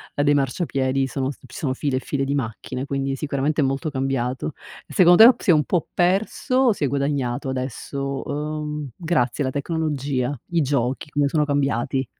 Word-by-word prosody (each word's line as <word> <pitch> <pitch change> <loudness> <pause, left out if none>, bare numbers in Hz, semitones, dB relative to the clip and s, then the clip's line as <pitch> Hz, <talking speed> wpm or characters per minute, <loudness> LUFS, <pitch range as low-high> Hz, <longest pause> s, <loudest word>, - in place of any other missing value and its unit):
dei 145 0 +3
marciapiedi 135 -1 0
sono 135 +1 -2
ci - - -22
sono 130 +1 -2
file 130 0 -1
e - - 0
file 135 +1 -2
di 135 +1 -1
macchine, 130 0 -3
quindi 135 -1 -2
sicuramente 145 +2 -1
è - - +3
molto 135 +4 -1
cambiato. 135 0 -2 0.3
E - - -11
secondo 180 +3 +8
te 245 - 0
si - - -2
è - - +8
un 150 -1 +3
po' 175 -4 0
perso, 195 +7 +1
o 260 -2 +5
si 195 - -1
è - - +1
guadagnato 140 -2 -1
adesso, 135 +1 -4
uhm, 150 0 -4
grazie 155 -6 0
alla 130 - -1
tecnologia, 145 -3 -1 0.2
i 170 -1 +2
giochi, 135 -1 -1
come 145 -1 +1
sono 150 +1 +1
cambiati? 135 -2 0
140 Hz, 180 wpm, -23 LUFS, 130-150 Hz, 0.3 s, secondo